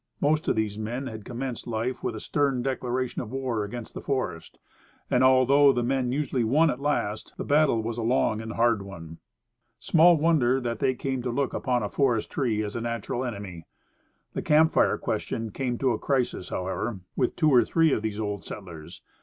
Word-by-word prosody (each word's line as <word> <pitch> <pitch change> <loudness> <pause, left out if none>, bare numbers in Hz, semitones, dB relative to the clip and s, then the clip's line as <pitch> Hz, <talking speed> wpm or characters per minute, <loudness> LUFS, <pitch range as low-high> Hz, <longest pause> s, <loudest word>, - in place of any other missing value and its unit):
Most 155 +2 +1
of - - +2
these 110 -1 -1
men 120 +5 -3
had 110 -5 -7
commenced 125 0 -5
life 120 +2 -2
with - - -3
a - - -5
stern 140 -4 0
declaration 130 -1 -2
of 115 - -8
war 130 -5 -2
against 115 +3 -7
the - - -6
forest; 125 -12 -3 0.5
and, 125 - +3
although 130 +2 +6
the 120 -2 -1
men 130 0 0
usually 135 -3 0
won 150 +8 +3
at 125 - -5
last, 140 -7 -2
the - - -3
battle 145 -6 +3
was 115 +1 -3
a - - -1
long 110 -2 +1
and 110 0 -6
hard 115 -2 +2
one. 80 -5 -10 0.6
Small 170 +1 +5
wonder 145 -5 +3
that 120 -3 -3
they 130 - +1
came 130 0 -3
to 125 - -3
look 135 +2 -1
upon 125 -4 0
a - - -1
forest 125 -6 +1
tree 115 -6 0
as 105 -1 -5
a 115 - -2
natural 115 +1 -3
enemy. 100 -8 -6 0.7
The - - -2
camp 155 +1 +4
fire - - +3
question 115 -1 -3
came 125 -1 -2
to 130 0 +1
a 110 - -1
crisis, 130 -9 -1
however, 95 +3 -3
with - - 0
two 155 -3 +3
or 125 -3 +6
three 165 +3 +2
of - - 0
these 110 -1 -3
old 105 -2 -3
settlers. 85 -6 -9
120 Hz, 200 wpm, -26 LUFS, 110-135 Hz, 0.7 s, although